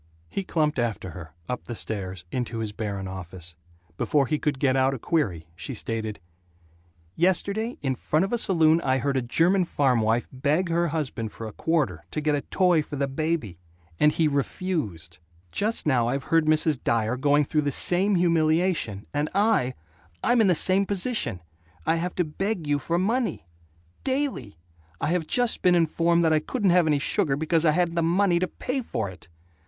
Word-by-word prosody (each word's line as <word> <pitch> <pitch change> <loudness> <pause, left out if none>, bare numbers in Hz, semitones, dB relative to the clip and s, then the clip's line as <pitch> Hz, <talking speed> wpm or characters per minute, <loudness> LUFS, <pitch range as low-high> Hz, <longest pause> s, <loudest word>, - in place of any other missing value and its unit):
He 195 - -3
clumped 155 -5 0
after 110 -6 -2
her, 80 -1 -9 0.2
up 125 - -4
the 120 - -6
stairs, 95 -5 -4
into 125 -2 -3
his 110 -2 -3
barren 100 -2 -4
office. 90 -2 -8 0.4
Before 145 -2 +2
he 155 +2 -1
could 145 -2 -1
get 130 -1 +2
out 135 0 +2
a - - -5
query 110 - -1
she - - -5
stated: 110 -2 -3 1.0
"Yesterday, 200 +6 +1
in 135 -2 +1
front 155 +7 0
of 195 - -5
a 240 - +1
saloon, 165 -4 +3
I 130 -3 +1
heard 140 +1 -1
a 130 - +1
German 170 +10 +2
farm 135 -8 +1
wife 115 +2 +1
beg 150 +7 0
her 170 +1 +1
husband 135 -8 -3
for 115 - -8
a 110 - -6
quarter, 140 - -1
to - - -3
get 150 0 0
a 145 - 0
toy 180 -2 +2
for 150 - -7
the 140 0 -1
baby 135 - -2 0.4
and 150 - +5
he 160 0 +1
refused. 140 - -3 0.3
Just 220 +3 +1
now 125 -6 +2
I've 135 +2 -1
heard 165 -1 +4
Mrs. 155 -2 +2
Dyer 115 +1 +1
going 145 +3 +3
through 150 +2 0
the 145 -1 -1
same 190 +8 +3
humiliation. 165 - +1
And 145 +1 -1
I 200 - +2 0.5
I'm 240 -1 +3
in 215 - +4
the 180 - +4
same 190 +4 +4
position! 200 - 0 0.4
I 165 - +2
have 175 +1 -3
to 180 - +1
beg 185 +3 -3
you 145 -1 +1
for 170 +5 -1
money. 220 - -1 0.6
Daily! 260 - -2 0.4
I 145 - -1
have 170 -2 0
just 245 -2 0
been 180 -1 +4
informed 170 +1 +2
that 160 -1 +3
I 155 - +4
couldn't 200 - 0
have 175 -2 +4
any 150 -2 +3
sugar 145 +1 +1
because 160 +2 +1
I 155 - +5
hadn't 175 0 +1
the 170 - 0
money 175 +2 +2
to 185 - 0
pay 260 +7 -4
for 110 - -3
it!" 95 -4 -12
155 Hz, 190 wpm, -25 LUFS, 125-175 Hz, 1.0 s, and